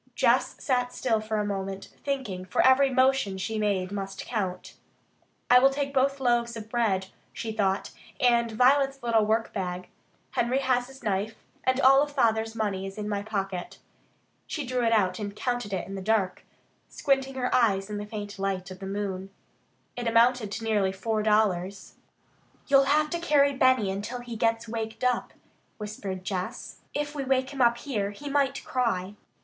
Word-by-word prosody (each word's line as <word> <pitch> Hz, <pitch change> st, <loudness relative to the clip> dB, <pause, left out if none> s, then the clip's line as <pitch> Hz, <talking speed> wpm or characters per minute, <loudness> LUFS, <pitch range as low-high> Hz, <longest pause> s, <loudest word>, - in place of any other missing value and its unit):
Jess -, -, +3 dB
sat 250 Hz, -2 st, 0 dB
still 230 Hz, -4 st, 0 dB
for 215 Hz, 0 st, -2 dB
a 210 Hz, -, 0 dB
moment, 195 Hz, -1 st, -4 dB
thinking, 260 Hz, -10 st, -3 dB
for 185 Hz, -, +1 dB
every 265 Hz, +1 st, +6 dB
motion 260 Hz, -6 st, +2 dB
she 215 Hz, +4 st, -3 dB
made 195 Hz, -3 st, 0 dB
must 195 Hz, -1 st, -5 dB
count. 190 Hz, -6 st, -3 dB, 0.7 s
"I 250 Hz, +1 st, +7 dB
will 270 Hz, +2 st, +6 dB
take 275 Hz, 0 st, -3 dB
both 275 Hz, +1 st, +2 dB
loaves 240 Hz, -2 st, +1 dB
of 220 Hz, -1 st, -8 dB
bread," 195 Hz, -6 st, +1 dB, 0.2 s
she 225 Hz, -, -4 dB
thought, 200 Hz, -2 st, 0 dB, 0.3 s
"and 235 Hz, -2 st, +3 dB
Violet's 270 Hz, +3 st, +3 dB
little 225 Hz, -3 st, +3 dB
workbag. 190 Hz, -5 st, -2 dB, 0.4 s
Henry 240 Hz, +2 st, +1 dB
has 255 Hz, -2 st, +1 dB
his 270 Hz, -1 st, -14 dB
knife. 210 Hz, +1 st, -1 dB, 0.3 s
And 260 Hz, 0 st, +2 dB
all 270 Hz, +2 st, +6 dB
Father's 225 Hz, -5 st, +1 dB
money 195 Hz, -3 st, -2 dB
is 195 Hz, -, -9 dB
in 210 Hz, -1 st, -4 dB
my 205 Hz, -1 st, -1 dB
pocket." 195 Hz, -4 st, -4 dB, 0.7 s
She 300 Hz, -3 st, -3 dB
drew 250 Hz, 0 st, -1 dB
it 230 Hz, -, +2 dB
out 190 Hz, -5 st, +2 dB
and 205 Hz, -1 st, -5 dB
counted 245 Hz, -3 st, -2 dB
it 190 Hz, -, -3 dB
in 195 Hz, -, -7 dB
the 195 Hz, -, -5 dB
dark, 200 Hz, -2 st, 0 dB, 0.4 s
squinting 270 Hz, -1 st, 0 dB
her 250 Hz, -1 st, -1 dB
eyes 195 Hz, -6 st, +3 dB
in 210 Hz, -1 st, -4 dB
the 205 Hz, 0 st, -5 dB
faint 205 Hz, -2 st, -7 dB
light 190 Hz, -1 st, -2 dB
of 185 Hz, -, -9 dB
the 195 Hz, -, -6 dB
moon. 195 Hz, -1 st, -3 dB, 0.7 s
It 245 Hz, -1 st, -3 dB
amounted 230 Hz, -1 st, +3 dB
to 225 Hz, -, -5 dB
nearly 210 Hz, -4 st, +1 dB
four 215 Hz, +3 st, -1 dB
dollars. 200 Hz, -3 st, +1 dB, 0.7 s
"You'll 275 Hz, -1 st, +5 dB
have 300 Hz, +2 st, +2 dB
to 340 Hz, -, -1 dB
carry 285 Hz, -4 st, +3 dB
Benny 255 Hz, -6 st, +3 dB
until 210 Hz, +6 st, -4 dB
he 240 Hz, -1 st, -7 dB
gets 225 Hz, +1 st, 0 dB
waked 225 Hz, 0 st, -5 dB
up," 250 Hz, -1 st, 0 dB, 0.4 s
whispered 205 Hz, -3 st, -6 dB
Jess. 185 Hz, -1 st, -4 dB, 0.2 s
"If 295 Hz, 0 st, -2 dB
we 285 Hz, -2 st, -3 dB
wake 260 Hz, 0 st, +1 dB
him 275 Hz, -2 st, -3 dB
up 235 Hz, -1 st, +4 dB
here, 225 Hz, -6 st, -2 dB
he 285 Hz, +8 st, -7 dB
might 275 Hz, -1 st, +1 dB
cry." 205 Hz, -7 st, -1 dB
225 Hz, 175 wpm, -27 LUFS, 200-260 Hz, 0.7 s, I